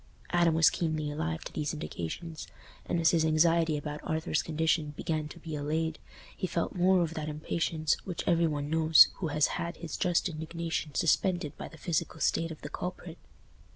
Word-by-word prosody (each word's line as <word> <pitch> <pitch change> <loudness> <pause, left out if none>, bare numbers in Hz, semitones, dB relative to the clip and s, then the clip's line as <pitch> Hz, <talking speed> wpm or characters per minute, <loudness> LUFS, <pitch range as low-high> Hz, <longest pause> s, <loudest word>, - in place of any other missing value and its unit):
Adam 170 -2 +3
was 165 -1 +6
keenly 155 -3 -1
alive 80 - -3
to - - -8
these 150 +1 -2
indications, 155 - -6 0.4
and 170 - 0
as 165 - +4
his 165 -2 +3
anxiety 160 0 +3
about 150 0 -5
Arthur's 160 -1 -1
condition 160 -1 0
began 155 -2 -2
to - - -11
be 160 -2 -6
allayed, 155 +2 -1 0.4
he 185 - -2
felt 170 0 -2
more 180 0 +4
of 165 -1 -3
that 155 -1 -4
impatience 155 +1 0
which 180 -3 -4
every 170 -1 +4
one 145 -2 -2
knows 160 0 +7
who 180 - -2
has 150 -1 +2 0.2
had 170 +1 -4
his 170 -3 -6
just 175 0 +1
indignation 160 -2 -4
suspended 170 -2 +1
by - - -7
the 160 - -13
physical 160 0 -2
state 165 - +1
of 160 - -9
the - - -6
culprit. 180 -2 -6
160 Hz, 185 wpm, -30 LUFS, 155-170 Hz, 0.4 s, knows